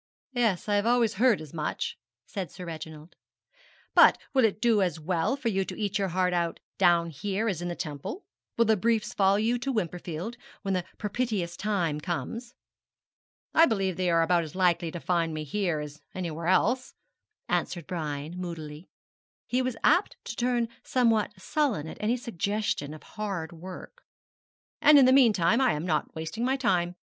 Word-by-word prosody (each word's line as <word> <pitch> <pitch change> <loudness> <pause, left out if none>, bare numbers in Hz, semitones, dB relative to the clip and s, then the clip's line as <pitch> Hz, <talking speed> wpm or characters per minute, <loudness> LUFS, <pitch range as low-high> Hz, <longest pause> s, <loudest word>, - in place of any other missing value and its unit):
'Yes, 225 -8 +1
I 205 -1 +2
have 205 +2 +1
always 235 -2 +3
heard 250 -5 +5
as 155 -3 -10
much,' 155 -2 -3 0.3
said 190 -4 -5
Sir 180 - -9
Reginald; 160 -1 -8 0.8
'but - - +7 0.2
will 260 -2 +4
it 215 -2 +2
do 225 -3 +3
as 175 -4 0
well 170 - 0
for 260 -4 -1
you 195 -2 +1
to - - -7
eat 205 -1 -1
your 195 - +1
heart 180 0 +1
out 170 -1 -1 0.2
down 170 -2 +4
here 200 +8 -2
as 185 -6 -1
in 175 - -3
the 175 - -3
Temple? 150 - -6 0.3
Will 230 - +4
the 220 0 +4
briefs 225 +2 0
follow 195 0 +3
you 230 +3 +1
to 270 +3 -2
Wimperfield 180 0 -3 0.3
when 195 -1 -1
the 180 -2 -1
propitious 210 -5 -2
time 180 -8 -1
comes?' 230 +8 -4 1.0
'I 330 - +7
believe 195 -5 0
they 185 0 0
are 165 -1 +4
about 170 0 +2
as 155 0 -9
likely 175 -2 +2
to 175 - -6
find 165 -2 0
me 155 - -3
here 175 0 -1
as 150 0 -8
anywhere 170 -3 -4
else,' 240 +8 +2 0.5
answered 175 -1 -1
Brian, 155 -3 -4
moodily, 165 -3 -7 0.6
he 250 +1 0
was 255 -3 -2
apt 355 +6 +3
to 230 - -5
turn 240 -1 +1 0.2
somewhat 225 -5 +1
sullen 230 - 0
at - - -8
any 225 +4 +1
suggestion 205 - -2
of 155 - -13
hard 195 -7 -4
work 185 - -10 0.8
'and 300 -1 +8
in 270 - +8
the 260 - +6
meanwhile 225 -4 +5
I 255 -3 +4
am 150 +3 -3
not 160 -4 -1
wasting 160 +9 -4
my 260 +2 +2
time. 180 -9 +1
185 Hz, 180 wpm, -28 LUFS, 170-230 Hz, 1.0 s, and